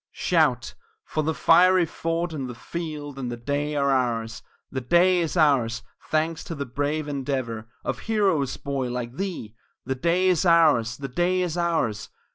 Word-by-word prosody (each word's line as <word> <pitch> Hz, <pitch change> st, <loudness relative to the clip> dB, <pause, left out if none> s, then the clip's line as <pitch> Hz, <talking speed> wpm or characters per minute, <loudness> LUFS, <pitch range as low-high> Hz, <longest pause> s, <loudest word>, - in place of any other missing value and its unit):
Shout -, -, +1 dB, 0.3 s
for 155 Hz, -, -2 dB
the 160 Hz, +1 st, -1 dB
fiery 180 Hz, +2 st, +5 dB
fort, 165 Hz, +1 st, -3 dB
and 135 Hz, -4 st, -4 dB
the 125 Hz, -, -7 dB
field, 150 Hz, -2 st, -6 dB
and 125 Hz, -2 st, -3 dB
the 120 Hz, -, -5 dB
day 145 Hz, +4 st, -2 dB
are 140 Hz, -1 st, +2 dB
ours 120 Hz, -3 st, -1 dB, 0.3 s
The 130 Hz, -, -3 dB
day 175 Hz, +7 st, +4 dB
is 170 Hz, +1 st, -2 dB
ours 125 Hz, -7 st, +2 dB, 0.3 s
thanks 160 Hz, +1 st, 0 dB
to 165 Hz, -, -5 dB
the 140 Hz, -1 st, -4 dB
brave 145 Hz, +4 st, -2 dB
endeavor 130 Hz, -6 st, -3 dB, 0.2 s
Of -, -, -2 dB
heroes, 195 Hz, -, 0 dB
boy, 135 Hz, -3 st, -3 dB
like 125 Hz, +1 st, -5 dB
thee! 175 Hz, -, -4 dB, 0.3 s
The 130 Hz, -, -1 dB
day 170 Hz, +7 st, +1 dB
is 180 Hz, -1 st, +2 dB
ours 150 Hz, -10 st, +4 dB
the 140 Hz, -, -5 dB
day 175 Hz, +7 st, +1 dB
is 175 Hz, -2 st, -2 dB
ours! 165 Hz, -12 st, -1 dB
145 Hz, 170 wpm, -25 LUFS, 125-170 Hz, 0.3 s, fiery